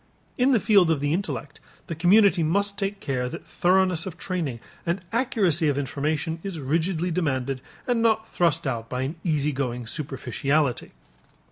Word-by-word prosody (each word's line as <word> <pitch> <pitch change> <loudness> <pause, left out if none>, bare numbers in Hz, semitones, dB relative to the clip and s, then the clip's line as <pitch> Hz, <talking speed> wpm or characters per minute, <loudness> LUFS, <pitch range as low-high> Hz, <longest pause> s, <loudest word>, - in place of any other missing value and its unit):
In 255 +2 +3
the 245 - +4
field 200 -5 +4
of 160 -3 +2
the 145 +2 0
intellect, 150 - -3 0.3
the - - -5
community 180 +3 +5
must 200 +6 +1
take 200 0 -3
care 125 -6 -2
that - - -8
thoroughness 185 -1 +2
of 185 - -7
training 165 -10 -3 0.2
and 170 +3 -1
accuracy 200 - +2
of 140 - 0
information 155 +3 -2
is 190 -4 -5
rigidly 165 +5 0
demanded 135 -6 -1 0.2
and 240 -2 +1
not 220 -1 +2
thrust 165 -2 +1
out 115 -4 -3
by 125 0 -2
an 140 +5 -3
easy 150 -4 +1
going 125 -3 -3
superficiality. 140 0 -1
160 Hz, 160 wpm, -25 LUFS, 140-190 Hz, 0.3 s, community